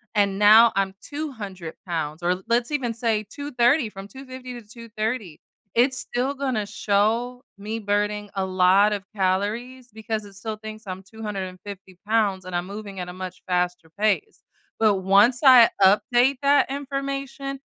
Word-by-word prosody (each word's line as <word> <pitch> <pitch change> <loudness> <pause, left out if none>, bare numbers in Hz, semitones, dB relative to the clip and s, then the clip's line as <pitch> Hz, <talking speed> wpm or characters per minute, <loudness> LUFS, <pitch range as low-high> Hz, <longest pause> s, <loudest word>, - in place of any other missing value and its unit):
and 200 -1 +2
now 220 +3 +8
I'm 195 -1 0
200 215 - -7
pounds 160 -1 -3
or, 180 +1 0
let's 235 +3 +1
even 250 -6 -1
say 225 -2 0
230 265 -2 +1
from 195 -1 -10
250 255 +1 -9
to 220 - -18
230, 220 -5 -5 0.4
it's 255 +2 +3
still 255 +3 -2
gonna 260 -6 -2
show 220 +5 0 0.2
me 215 +3 -4
burning 205 -1 -1
a 195 -2 -1
lot 190 +2 +4
of 205 -2 -3
calories 215 +7 -2
because 220 -1 -4
it 200 - -13
still 215 +3 -5
thinks 215 +1 -9
I'm 185 0 -6
250 195 -2 -8
pounds, 210 -4 +1
and 185 -1 -6
I'm 175 0 -1
moving 200 0 -8
at 180 - -4
a - - -7
much 185 0 -8
faster 180 -2 -1
pace, 215 - 0 0.4
but 215 -2 +4
once 200 +6 +4
I 250 -3 +9
update 245 +7 +4
that 280 -1 +3
information, 275 0 -4
215 Hz, 150 wpm, -24 LUFS, 195-245 Hz, 0.4 s, I